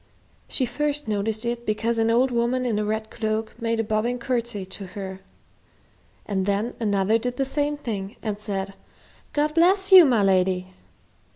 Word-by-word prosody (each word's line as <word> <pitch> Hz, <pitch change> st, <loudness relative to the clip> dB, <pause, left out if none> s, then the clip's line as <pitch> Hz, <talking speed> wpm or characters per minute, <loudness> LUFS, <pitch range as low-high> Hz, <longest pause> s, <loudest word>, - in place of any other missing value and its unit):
She 260 Hz, -, 0 dB
first 295 Hz, +3 st, -2 dB
noticed 215 Hz, +2 st, -1 dB
it 235 Hz, 0 st, -2 dB
because 225 Hz, +1 st, -1 dB
an 225 Hz, 0 st, +2 dB
old 250 Hz, +3 st, +3 dB
woman 240 Hz, +2 st, 0 dB
in 220 Hz, -4 st, 0 dB
a -, -, 0 dB
red 220 Hz, +1 st, -3 dB
cloak 220 Hz, 0 st, -2 dB
made 230 Hz, 0 st, 0 dB
a -, -, +2 dB
bobbing 220 Hz, +3 st, -1 dB
courtesy 235 Hz, -5 st, -2 dB
to 190 Hz, +1 st, -7 dB
her, 190 Hz, -1 st, -6 dB, 1.1 s
and 190 Hz, -2 st, -2 dB
then 205 Hz, +4 st, 0 dB
another 205 Hz, 0 st, +2 dB
did 245 Hz, +1 st, -4 dB
the 270 Hz, -, +1 dB
same 290 Hz, +2 st, -1 dB
thing 210 Hz, -5 st, -5 dB
and 210 Hz, -3 st, -3 dB
said, 195 Hz, -2 st, -4 dB, 0.6 s
"God 300 Hz, +1 st, 0 dB
bless 380 Hz, +4 st, +4 dB
you, 375 Hz, -2 st, +11 dB
my 240 Hz, -7 st, +3 dB
lady!" 185 Hz, -1 st, +1 dB
225 Hz, 170 wpm, -24 LUFS, 205-250 Hz, 1.1 s, you